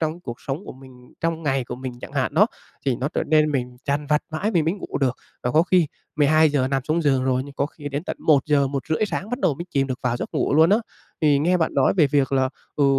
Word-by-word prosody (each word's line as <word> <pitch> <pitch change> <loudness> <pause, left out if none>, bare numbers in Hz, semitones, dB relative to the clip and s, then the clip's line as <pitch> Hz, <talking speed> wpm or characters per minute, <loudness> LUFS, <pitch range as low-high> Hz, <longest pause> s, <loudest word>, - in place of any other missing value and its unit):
trong 160 +2 -2
cuộc 120 -8 -7
sống 145 +8 -4
của - - -8
mình, 130 -1 -16
trong 165 0 -1
ngày 135 -4 0
của 120 - -6
mình 130 0 -6
chẳng - - -9
hạn 140 +1 -1
đó, 205 +6 +6 0.4
thì 130 - +2
nó 130 +4 -2
trở - - -2
nên 155 0 +3
mình 125 -2 -2
dằn 145 +1 -1
vặt 150 +1 +2
mãi 160 +7 -1
mình 170 -7 +2
mới 165 +5 +1
ngủ 195 - -5
được. 130 -3 +1 0.3
Và 125 - 0
có 155 +5 +4
khi 180 -3 +3 0.3
12:00 150 -2 +3
nằm 135 -1 0
xuống 165 +2 0
giường 135 -4 +2
rồi, 130 -1 +1
nhưng 140 0 -11
có 140 - 0
khi 145 -1 -8
đến 145 +3 -4
tận - - -4
1:00-1:30 145 +4 +2
sáng 205 +1 -4
bắt 245 - -2
đầu 150 - +2
mới 170 - -6
chìm 135 -1 +1
được 130 -1 -4
vào 120 -1 0
giấc - - -6
ngủ - - +1
luôn 160 +3 +5
á. 210 - +5 0.4
Thì 150 -3 +4
nghe 175 +5 +2
bạn 160 -2 0
nói 135 - +3
về 160 -5 +5
việc 140 -1 +1
là, 130 -1 +2 0.3
ừ, 145 - +3
145 Hz, 265 wpm, -23 LUFS, 135-160 Hz, 0.4 s, đó